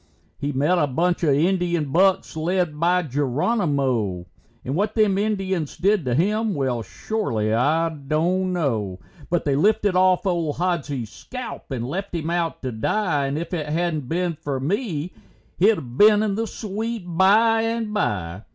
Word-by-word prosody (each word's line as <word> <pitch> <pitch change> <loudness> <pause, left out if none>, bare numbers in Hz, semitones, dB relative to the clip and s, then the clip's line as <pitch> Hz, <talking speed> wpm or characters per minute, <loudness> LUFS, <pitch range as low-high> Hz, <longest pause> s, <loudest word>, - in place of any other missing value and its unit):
He 145 - -2
met 150 +7 +2
a 150 - +2
bunch 170 +6 0
of 150 -5 +3
Indian 170 -2 +1
bucks 190 +2 +2
led 165 -1 -1
by 180 +2 +2
Geronimo, 135 - 0 0.4
And 130 - -2
what 205 +4 0
them 210 -3 +3
Indians 190 -7 -1
did 200 -3 +2
to 125 -1 0
him, 210 - +1
well, 130 -4 -1
shorely 110 - -2
I 155 +8 +2
don't 160 +5 -1
know. 115 - -1 0.3
But 175 -1 0
they 140 -2 +2
lifted 205 +4 +2
off 185 +1 +3
old 170 -5 0
Hodsie's 145 - -2
skelp 250 - -8
and 125 -4 -3
left 190 +6 -4
him 165 0 -2
out 170 -3 -2
to 130 - -2
die, 145 - 0
And 140 +2 -2
if 170 +3 -5
it 155 -4 -2
hadn't 155 -3 -1
been 175 +1 0
for 145 -3 -4
me, 175 - -2 0.5
he'd 170 - +2
been 210 0 +6
in 210 -2 0
the 225 +3 -2
sweet 220 +1 -4
by 205 +6 +4
and 225 -1 -2
by. 95 - -2
170 Hz, 160 wpm, -23 LUFS, 140-195 Hz, 0.5 s, been